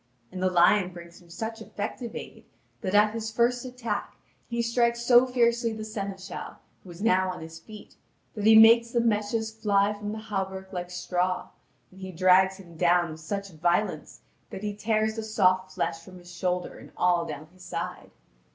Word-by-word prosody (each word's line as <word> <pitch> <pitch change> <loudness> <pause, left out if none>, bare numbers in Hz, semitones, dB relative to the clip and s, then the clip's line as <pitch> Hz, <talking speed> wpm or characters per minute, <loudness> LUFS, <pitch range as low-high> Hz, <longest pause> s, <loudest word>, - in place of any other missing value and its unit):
And 185 - -6
the 185 - +2
lion 180 +1 +4
brings 170 0 -12
him 175 - -20
such 220 +6 -6
effective 220 +3 -6
aid, - - -9 0.4
that 190 +2 -2
at 210 +1 +5
his 225 -1 -4
first 240 +2 +1
attack, 235 -5 -4 0.3
he 235 0 -3
strikes 235 0 +1
so 245 +1 +6
fiercely 235 -2 +1
the 215 0 -6
seneschal, 195 -3 -6 0.3
who 185 - -15
was 175 +3 -8
now 185 -4 +3
on 180 -1 -5
his 160 0 -9
feet, 210 +5 -13 0.4
that 210 -2 -1
he 220 - +8
makes 230 +1 +7
the 235 - 0
meshes 220 0 0
fly 205 -2 +1
from 205 0 -6
the 215 - -5
hauberk 190 -3 -5
like 180 -1 -4
straw, 180 0 -2 0.4
and 190 +1 -15
he 190 0 -6
drags 185 +2 +4
him 170 -4 -14
down 175 -1 +3
with 155 - -9
such 200 +4 -5
violence 175 +6 -1 0.3
that 190 - -8
he 210 -1 -2
tears 215 +1 0
the 225 - -3
soft 185 -3 +2
flesh 165 -1 -2
from 185 +2 -13
his 175 0 -13
shoulder 180 +1 -2
and - - -14
all 175 -1 +3
down 155 -2 -7
his 185 -1 -16
side. 180 +2 -5
200 Hz, 190 wpm, -27 LUFS, 180-220 Hz, 0.4 s, he